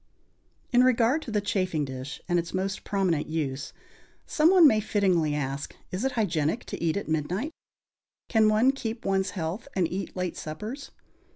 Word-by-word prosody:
In 245 0 +5
regard 255 +3 +3
to 240 - -7
the 210 -1 +1
chafing 185 -7 0
dish 130 +2 -6
and 175 -2 +2
its 170 +2 -4
most 190 +1 -2
prominent 185 -6 0
use, 140 -3 -3 0.5
some 310 +1 +3
one 365 -3 +7
may 220 -6 +4
fittingly 185 -8 +1
ask: 140 -1 -3 0.2
Is 185 +5 -3
it 265 - 0
hygienic 170 -2 0
to - - -4
eat 165 +2 +1
at 200 - -4
midnight? 170 - -1 0.8
Can 220 -2 +4
one 220 +5 +4
keep 230 -4 -5
one's 190 0 +1
health 180 +9 -3
and 180 -3 +2
eat 190 +2 -4
late 180 -2 -2
suppers? 215 - -6
190 Hz, 170 wpm, -27 LUFS, 160-225 Hz, 0.8 s, one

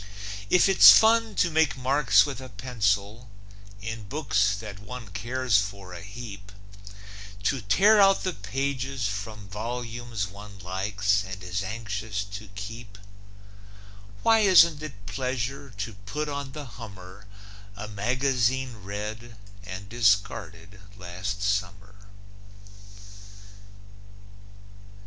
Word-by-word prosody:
If 180 - +5
it's 195 - +9
fun 225 0 +4
to 170 - +2
make 160 -3 +2
marks 130 +2 +4
with 140 -2 -6
a 130 - -9
pencil 105 -1 -1 0.5
In 110 -1 -5
books 100 -6 +1
that 100 -1 -8
one 115 +1 -9
cares 120 +2 +1
for 100 -2 -5
a 85 - -8
heap; 105 -1 -9 0.9
To 130 +4 0
tear 195 - +5
out 195 0 +5
the 185 - -1
pages 130 +3 -2
from 100 0 -6
volumes 115 +1 -4
One 100 +2 -11
likes 100 +2 0
and 95 -1 -8
is 90 +2 -2
anxious 105 0 -4
to 100 +1 -9
keep, 105 0 -8 1.3
Why 225 0 +5
isn't 170 -7 +6
it 115 -10 -9
pleasure 130 +3 -3
to 110 0 -6
put 105 +10 -5
on 140 -2 -5
the 150 -1 -7
hummer 100 -4 -11 0.5
A 105 - -6
magazine 125 +3 0
read 105 +4 -6 0.3
and 100 0 -8
discarded 100 -3 0 0.2
last 95 +2 -5
summer? 100 0 -3
105 Hz, 115 wpm, -26 LUFS, 100-130 Hz, 1.3 s, it's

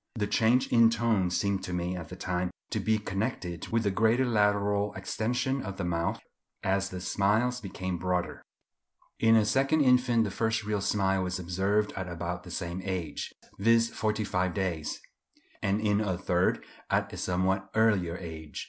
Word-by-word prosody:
The 105 -3 0
change 115 +4 +3
in 115 -1 +6
tone 115 -5 +1
seemed 95 +2 0
to 90 - -5
me 90 +1 -2
at 85 -2 -7
the 90 - -7
time 90 -1 -2 0.2
to - - 0
be 110 0 +2
connected 95 -4 -3
with 115 0 0
the 100 - +1
greater 115 +6 +3
lateral 105 -2 +1
extension 125 +7 -1
of 100 -4 -6
the 100 - -3
mouth 85 -1 -1 0.4
as 95 +1 +1
the 90 - -6
smiles 110 +7 +1
became 95 -2 -4
broader. 90 0 -1 0.8
In 115 0 +5
a 110 -2 +5
second 135 +7 +2
infant 125 -3 +4
the 100 - -2
first 110 +2 0
real 105 -1 -1
smile 95 -1 +1
was 90 0 -2
observed 95 +4 0
at 95 -1 -4
about 85 +1 -4
the 90 - -12
same 85 +1 -4
age, 90 -6 -3 0.3
viz. 115 +2 +4
forty 110 0 -1
five 90 -3 -1
days; 85 -6 -2 0.6
and 100 +1 +1
in 105 -1 +2
a 95 -4 -1
third, 90 0 +1 0.2
at - - 0
a - - -5
somewhat 95 +2 0
earlier 100 -6 +2
age. 80 -4 -8
100 Hz, 175 wpm, -29 LUFS, 90-110 Hz, 0.8 s, in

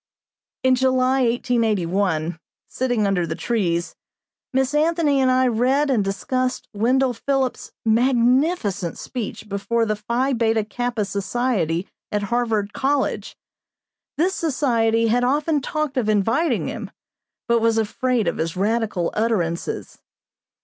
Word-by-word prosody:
In 260 0 +4
July, 260 +1 +2
1881, 200 -9 0 0.3
sitting 245 -4 0
under 185 -4 +1
the 160 - -3
trees, 175 -7 -1 0.6
Miss 265 +1 +1
Anthony 305 -2 +2
and 260 - +3
I 255 0 +3
read 260 +5 +2
and 225 -6 +2
discussed 255 +7 -2
Wendell 250 +5 +2
Phillips' 265 +2 -2
magnificent 235 - +2
speech 225 -3 -6
before 205 +3 0
the 215 -1 0
Phi 235 +6 -1
Beta 225 -2 +1
Kappa 240 0 -2
Society 195 -3 -1 0.2
at 210 -1 -1
Harvard 220 -4 0
College. 275 +1 -1 0.8
This 360 +5 +2
society 230 -8 +1
had 245 +2 +2
often 290 +3 +1
talked 305 0 -2
of 225 -4 +1
inviting 225 - +1
him, - - -5 0.6
but 235 -1 +3
was 225 0 +2
afraid 230 +1 0
of - - -1
his 165 +2 -2
radical 210 -3 0
utterances. 195 -7 -2
235 Hz, 120 wpm, -22 LUFS, 205-260 Hz, 0.8 s, In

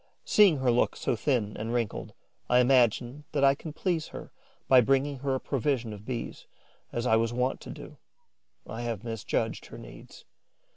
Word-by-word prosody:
Seeing 200 -7 +5
her 130 -2 +2
look 120 - +2
so - - -1
thin 110 -3 0
and 110 +2 -4
wrinkled, 115 -4 -3 0.3
I 125 - +5
imagine 125 +2 +3
that 140 -2 +1
I 135 0 +6
can 155 +3 -8
please 165 0 -1
her - - -9 0.4
by 130 -1 +7
bringing 135 +3 +1
her 135 0 -1
a - - -1
provision 130 -5 -1
of 105 0 -11
Bees, 125 -3 -5 0.4
as 120 +1 -3
I 110 -3 +4
was 115 +1 0
wont 125 +2 -1
to - - -10
do. - - -10 0.7
I 115 - -6
have 115 -3 -4
misjudged 115 -3 -3
her - - -10
needs. - - -13
125 Hz, 180 wpm, -28 LUFS, 115-140 Hz, 0.7 s, by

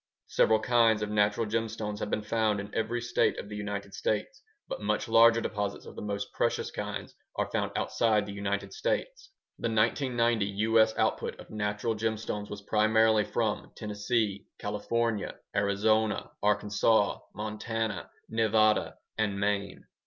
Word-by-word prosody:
Several 110 0 +4
kinds 115 -2 +3
of 105 - -3
natural 105 +1 +2
gemstones 110 -1 -2
have 105 - -3
been 105 - -1
found 110 -1 +1
in 100 0 -7
every 115 +2 -1
State 120 +1 +1
of 100 - -6
the 105 - -6
United 100 -1 -4
States, 110 - -2 0.3
but - - -5
much - - 0
larger 115 0 +6
deposits 105 -2 -3
of - - -10
the - - -6
most 100 -1 -4
precious - - 0
kinds - - -5 0.2
are - - -1
found - - -1
outside 110 -3 +2
the 100 - -7
United 100 -1 -3
States. - - -2 0.3
The 115 - -1
1990 115 0 +2 0.2
U.S. 110 0 +4
output - - 0
of - - -12
natural 105 +1 -1
gemstones 110 -1 -3
was 100 -1 -7
primarily 110 0 +3
from 110 -3 -2
Tennessee, 105 -1 -1
California, 115 -3 -1 0.2
Arizona, 105 +2 +1
Arkansas, 105 0 +2 0.2
Montana, 110 +1 -3 0.2
Nevada, 110 -1 +2 0.2
and 100 -2 0
Maine. 100 -1 -1
110 Hz, 145 wpm, -29 LUFS, 105-115 Hz, 0.3 s, larger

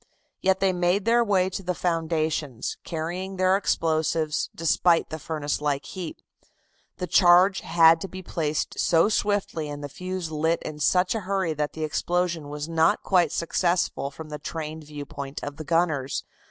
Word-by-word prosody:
Yet 190 0 +2
they 190 -1 +3
made 180 +3 +1
their 235 +1 +4
way 195 -4 +2
to 195 - -4
the 180 -1 -2
foundations, 160 -7 -1
carrying 175 +4 -4
their 185 +1 +4
explosives, 160 -4 0
despite 165 +1 +2
the 160 - -4
furnace 150 -1 -3
like 145 -1 -1
heat. 180 -4 -7 0.7
The 180 - -3
charge 180 +2 +5
had 165 0 +5
to - - -4
be 185 0 -9
placed 155 -4 -2
so 170 +3 +4
swiftly 205 -8 -1
and 145 0 -6
the 145 - -5
fuse 180 +1 -5
lit 160 +2 0
in 150 -1 -6
such 180 +4 +3
a 225 - -1
hurry 190 -4 -1
that 150 -1 -2
the 160 - -4
explosion 170 0 -1
was 150 +1 -5
not 165 +4 +2
quite 180 -3 +3
successful 170 -3 0
from 155 +2 -10
the 150 0 -6
trained 155 +1 -6
viewpoint 145 -1 -7
of 145 0 -6
the 155 - -6
gunners. 155 -4 0
165 Hz, 165 wpm, -25 LUFS, 150-185 Hz, 0.7 s, charge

